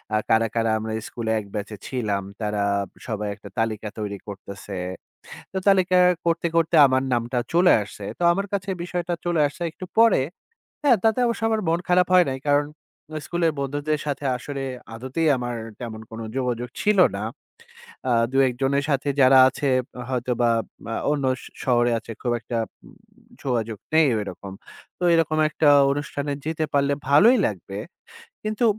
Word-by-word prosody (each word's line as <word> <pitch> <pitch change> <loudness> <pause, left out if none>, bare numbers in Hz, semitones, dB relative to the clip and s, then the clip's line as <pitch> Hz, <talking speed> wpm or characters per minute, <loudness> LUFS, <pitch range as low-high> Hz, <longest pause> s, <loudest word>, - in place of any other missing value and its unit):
আ - - +4
কারা, 115 0 +4
কারা 115 -1 +1
আমরা 110 0 -4
স্কুলে 115 -2 -3
১ 105 - -8
ব্যাচে 105 +1 -4
ছিলাম, 105 -6 -2 0.2
তারা 105 -1 -1 0.3
বি - - -24
সবাই 105 -3 -3
একটা 100 - -12
তালিকা 110 -1 -1
তৈরি 100 -1 -4
করতেছে। 100 -1 -8 0.7
তো 190 - -4
তালিকা 185 -2 +4 0.3
করতে, 170 0 +1
করতে 165 0 +2
আমার 130 0 +1
নামটা 120 +1 0
চলে 175 +1 +5
আসছে। 100 0 -8
তো - - -3
আমার 195 +3 -1
কাছে 195 0 -2
বিষয়টা 175 0 -3
চলে 175 -2 +1
আসছে 145 - -13
একটু 185 - -9
পরে, 225 -9 +6 0.6
হ্যাঁ? 270 -6 +5
তাতে 225 +2 +3
অবশ্য 235 -1 -1
আমার 220 -1 +1
মন 165 +1 +2
খারাপ 180 0 +4
হয় 180 -1 +7
নাই। 135 0 -4
কারণ 145 0 +4 0.5
আ - - -1
স্কুলের 170 -2 0
বন্ধুদের 145 +2 -1
সাথে 145 -1 -3
আসলে 140 +1 -5 0.3
আদতেই 130 +7 -2
আমার 120 -1 -3 0.2
তেমন 110 -3 -6
কোন 110 - -7 0.2
যোগাযোগ 125 -1 -2
ছিল 210 -1 +3 0.2
না। - - -4 0.9
আ - - +2 0.2
২-১ 135 -2 +3
জনের 140 +1 +1
সাথে 140 0 0
যারা 130 0 +7
আছে 140 +1 -1 0.4
হয়তোবা 120 -2 +1 0.4
আ - - -2 0.2
অন্য 145 -2 0 0.2
শ - - -14 0.2
শহরে 120 -1 +3
আছে, 115 - -10
খুব 120 - -1
একটা 115 +1 -4 0.3
উম - - -16 0.5
যোগাযোগ 115 -4 -1 0.2
নেই 160 -1 +5
ওইরকম। 100 -1 -7 0.4
তো - - -6
এরকম 160 -2 +2
একটা 155 -1 +3 0.2
অনুষ্ঠানে 145 0 -3
যেতে 160 0 -1
পারলে 140 0 +2 0.2
ভালোই 220 - +6
লাগবে। - - -6 0.7
কিন্তু 215 +2 -1
135 Hz, 165 wpm, -24 LUFS, 115-165 Hz, 0.9 s, হয়